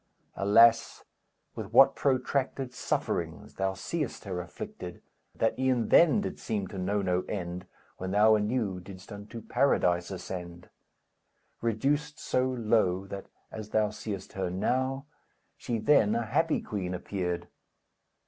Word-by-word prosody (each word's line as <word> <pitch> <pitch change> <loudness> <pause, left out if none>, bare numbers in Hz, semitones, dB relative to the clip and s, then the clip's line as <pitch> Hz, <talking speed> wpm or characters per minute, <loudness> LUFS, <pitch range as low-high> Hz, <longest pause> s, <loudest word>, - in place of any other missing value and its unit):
Alas, 115 +3 +5 0.5
with - - -7
what - - +7
protracted 135 -1 0
sufferings - - -2
Thou 95 0 -1
seest 140 - -3
her 90 -3 -3
afflicted, 90 0 -8 0.3
that, 115 - 0
e'en 130 -3 +1
then 175 +5 +6
Did - - -5
seem 105 -4 -2
to 95 - -6
know 100 +2 0
no 90 -1 +1
end, 90 -2 -4 0.3
When 95 - -4
thou 105 +3 +5
anew 105 -3 0
didst 95 +2 -12
unto 105 +3 -8
Paradise 90 -10 +2
ascend! 90 -2 -7 0.9
Reduced 145 +6 0
so 130 0 0
low, 110 -6 +1
that, 100 0 -7 0.2
as 110 -1 -7
thou 110 -1 +2
seest 105 -2 -6
her 95 -2 -2
now, 130 +9 -1 0.5
She 120 - -3
then 110 -3 +4
a 115 0 0
happy 155 +7 +1
Queen 90 -3 -3
appeared. 90 -2 -3
105 Hz, 130 wpm, -29 LUFS, 95-125 Hz, 0.9 s, what